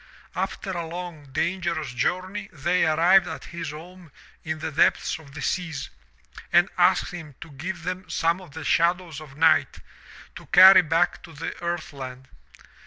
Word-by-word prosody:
After 195 - -3
a 170 -3 -4
long, 170 -3 -7
dangerous 165 -2 -2
journey 185 +10 -2
they 175 +3 +1
arrived 175 +4 +4
at 160 -4 -7
his 170 -2 -5
home 170 +2 -11 0.3
in 160 0 -3
the 155 +1 -5
depths 150 - +2
of 145 -3 -16
the 150 - -6
seas 165 -7 -3 0.6
and - - +5
asked - - +3
him 160 -6 -9
to 165 - -11
give 170 +5 -6
them 180 0 -5
some 170 +2 0
of 165 -5 -14
the 160 - -6
shadows 170 -1 +1
of 145 -3 -13
night 160 0 +3 0.6
to - - -13
carry 185 0 +9
back 165 +2 0
to 165 - -13
the 155 +2 -5
earth 170 -2 -4
land. 130 -1 -9
165 Hz, 165 wpm, -25 LUFS, 155-180 Hz, 0.6 s, carry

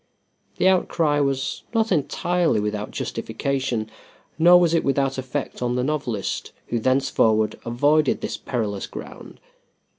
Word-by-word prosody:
The - - +3
outcry 165 -5 +2
was 140 -1 -1
not 225 -1 +2
entirely 175 - +1
without 105 0 -3
justification, 120 -1 -3 0.5
nor 175 +2 +8
was 170 -2 +2
it 165 - +2
without 135 -1 0
effect 130 +1 -4
on 125 0 0
the 125 - 0
novelist, 130 -8 -2 0.2
who 120 - 0
thenceforward 115 -4 +2
avoided 145 +5 +2
this - - -3
perilous 105 -6 -3
ground. - - -10
135 Hz, 125 wpm, -23 LUFS, 115-155 Hz, 0.5 s, nor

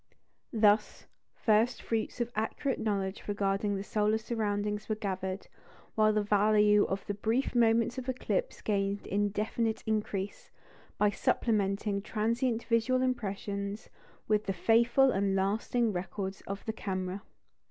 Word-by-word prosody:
Thus, 215 -2 +2 0.3
first 225 +3 +2
fruits 225 +1 -2
of 240 0 -1
accurate 225 +5 -1
knowledge 200 -3 -2
regarding 200 0 0
the 195 - -3
solar 210 +1 +1
surroundings 210 -2 -2
were 215 - +1
gathered, 190 -2 -3 0.5
while 215 0 +4
the 210 0 +1
value 210 0 +4
of 195 +1 -3
the 205 - -2
brief 225 +6 0
moments 230 +1 +3
of 260 0 -6
eclipse - - -2
gained 200 -1 -1
indefinite 210 +2 -1
increase, 210 -2 -2 0.5
by 210 0 +3
supplementing 200 -1 0
transient 230 +3 0
visual 255 +2 +2
impressions 200 -4 -3 0.4
with 215 0 +1
the 195 - +1
faithful 235 +7 +4
and 195 -2 +1
lasting 215 +4 +1
records 190 +2 -4
of 200 0 -5
the 220 - -2
camera. 190 -2 -3
210 Hz, 130 wpm, -30 LUFS, 200-225 Hz, 0.5 s, while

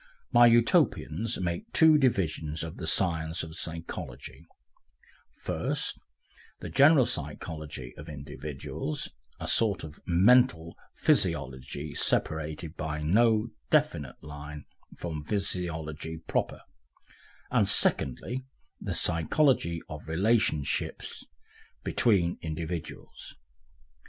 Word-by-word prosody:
My 120 -2 +7
Utopians 115 -3 +2
make 85 -2 -3
two 160 -1 +7
divisions 80 - 0
of 80 0 -7
the 80 - -5
science 80 -2 +1
of 80 0 -8
psychology, 80 0 -7 0.9
first, - - -2 0.6
the - - -6
general 140 -1 +6
psychology 75 - -5
of 75 +2 -9
individuals, 75 +1 -5 0.3
a - - -5
sort 105 -5 +3
of 75 -2 -9
mental 90 -2 +4 0.2
physiology 65 +3 0
separated 80 +1 -1
by 75 -1 -4
no 110 +6 +3 0.2
definite 140 - 0
line 75 0 -8 0.3
from 80 -3 -5
physiology 80 -5 -3
proper, 80 - -2 0.9
and - - +3
secondly, 120 - +2 0.4
the - - -3
psychology 85 - +2
of 75 -1 -9
relationship 85 -3 +1 0.8
between 90 -7 +2
individuals. 80 +1 -6
80 Hz, 90 wpm, -28 LUFS, 75-105 Hz, 0.9 s, My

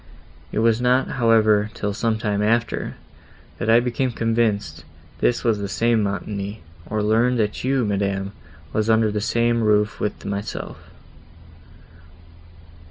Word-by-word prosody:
It - - -5
was 115 +1 +3
not, 125 +2 +2
however, 110 -2 +4
till 105 -1 -2
some 110 +1 0
time 105 -2 -1
after, 115 +2 0 0.6
that 115 - -2
I 115 +1 +7
became 125 +1 -1
convinced 115 -2 -1 0.4
this 120 - +1
was 115 -3 +1
the 100 -1 -4
same 115 +3 +2
Montoni, 100 0 -4 0.3
or 110 0 -1
learned 115 +4 +2
that 105 -2 -1
you, 130 -1 +1
madam, 100 -1 -1 0.4
was 110 +1 0
under 110 -1 +3
the 105 0 -2
same 115 +1 +1
roof 105 0 +2
with 105 - -3
myself. 100 +1 -5
110 Hz, 135 wpm, -22 LUFS, 105-115 Hz, 0.6 s, I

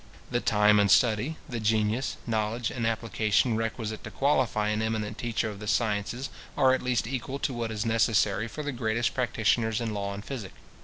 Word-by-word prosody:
The 120 - +1
time 105 0 +4
and 100 -1 +3
study, 120 +8 +3
the 120 -5 -4
genius, 110 +3 0
knowledge, 115 +1 -1
and 115 -3 -1
application 110 0 +1
requisite 110 -1 -3
to - - -6
qualify 130 -6 +1
an 105 0 0
eminent 110 -1 -2
teacher 115 -1 -1
of 105 -2 -6
the 105 - -7
sciences, 110 +4 -1 0.3
are 130 -1 +5
at 130 - 0
least 125 -3 0
equal 130 +2 -3
to 140 - -2
what 120 -1 -3
is 110 0 -3
necessary 110 -2 +2
for 150 +7 -6
the 145 - -2
greatest 115 -2 0
practitioners 115 -2 +1
in 115 -2 -2
law 100 -1 -3
and 100 - -8
physic. 120 -9 -6
110 Hz, 190 wpm, -28 LUFS, 105-120 Hz, 0.3 s, are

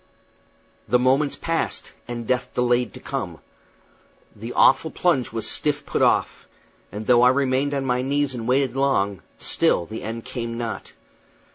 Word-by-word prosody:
The 125 - +4
moments 135 +3 +2
passed, 165 -1 -2 0.2
and 120 -1 -5
death 125 +1 -1
delayed 125 -1 +1
to - - -9
come. - - -5 1.0
The 115 +3 -7
awful 160 - +4
plunge 160 -7 +1
was 115 -1 -1
still 150 -1 +2
put - - -2
off; - - +1 0.4
and 105 +2 -6
though 120 0 +5
I 125 - +7
remained 135 +1 +1
on 135 -1 -2
my 125 -1 +1
knees 140 +1 0
and 115 -2 -5
waited 130 0 +1
long, 100 -9 +1 0.2
still 85 - +1
the 110 +5 -7
end 115 +1 -6
came 115 -1 -5
not. 115 -1 -5
125 Hz, 155 wpm, -23 LUFS, 115-140 Hz, 1.0 s, I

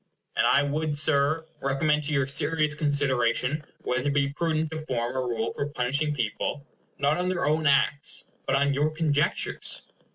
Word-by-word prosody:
And - - +3
I 140 - +4
would, 150 +1 -1
Sir, 155 +1 +2
recommend 150 +3 +1
to 150 - -3
your 140 -3 +2
serious 150 +2 0
consideration 145 -2 +1 0.2
whether 130 +2 -1
it 140 - +1
be 140 -1 +2
prudent 160 0 -1
to 160 -1 -5
form 120 0 -2
a - - 0
rule 115 -2 -2
for 140 - -2
punishing 140 +2 0
people, 130 +3 -2 0.3
not 145 +2 +2
on 180 0 0
their 185 -1 0
own 155 0 +2
acts, 140 +1 +2 0.2
but 135 - +2
on 140 0 +2
your 145 +2 +2
conjectures? 155 -2 -1
145 Hz, 170 wpm, -26 LUFS, 135-155 Hz, 0.3 s, I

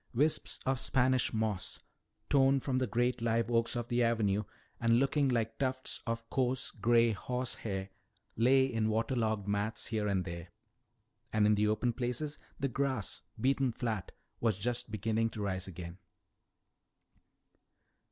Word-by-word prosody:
Wisps 150 +5 +1
of 130 -1 +1
Spanish 130 -1 +2
moss, 110 -4 -2 0.5
torn 135 0 +4
from 130 -1 0
the 130 - 0
great 120 0 0
live 115 0 +1
oaks 115 +1 +2
of 120 -1 -2
the 120 0 +1
avenue 105 -3 +2 0.3
and 115 0 +4
looking 140 +2 +2
like 115 -2 -1
tufts 130 -1 -1
of 115 0 -2
coarse 130 -1 +1
gray 115 +2 +3
horsehair, 110 -4 -3 0.5
lay 130 +4 +5
in 115 -4 0
water 115 +4 0
logged 110 -4 0
mats 100 +2 -1
here 110 -2 -1
and 95 -3 0
there. 85 0 -6 0.8
And 110 -1 +3
in 105 - +5
the 105 0 +2
open 115 +3 +1
places, 130 +5 -3 0.2
the 135 - +1
grass, 130 -4 -2 0.2
beaten 135 -1 +2
flat, 110 -4 -3 0.3
was 110 -5 +1
just 120 +3 -2
beginning 110 +1 0
to 110 -2 -5
rise 95 -1 -2
again. 90 0 -8
115 Hz, 145 wpm, -33 LUFS, 105-130 Hz, 0.8 s, lay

